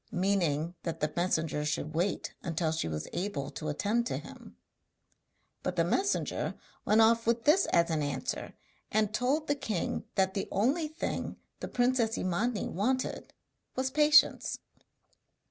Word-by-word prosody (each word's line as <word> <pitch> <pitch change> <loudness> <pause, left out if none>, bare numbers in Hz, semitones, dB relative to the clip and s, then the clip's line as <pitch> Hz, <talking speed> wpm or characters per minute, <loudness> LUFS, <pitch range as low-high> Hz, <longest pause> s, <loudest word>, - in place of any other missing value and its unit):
meaning 175 -4 +1
that 165 -1 -4
the 150 - -1
messenger 160 -4 0
should 155 0 -2
wait 175 +5 -1 0.2
till 160 -1 +1
she 160 - -1
was 75 -1 -4
able 175 -7 -3
to 155 - -5
attend 210 +10 +1
to 235 - -2
him. - - -11 1.0
But - - -2
the - - +3
messenger 395 +1 0 0.3
went 215 +2 +5
off 230 +1 +4
with 235 0 +2
this 350 +6 +4
as 170 0 +3
an 155 -1 +1
answer, 145 -1 -3 0.4
and 215 0 +1
told 265 +7 +1
the 290 - +2
king 220 -10 -2
that 190 -1 +2
the 195 - -2
only 275 - +1
thing 315 +3 -4 0.2
the - - -4
princess 245 -2 +1
Imani 205 +5 0
wanted 255 +8 -1 0.4
was 260 0 -1
'patience.' 300 +2 +5
205 Hz, 145 wpm, -30 LUFS, 165-250 Hz, 1.0 s, went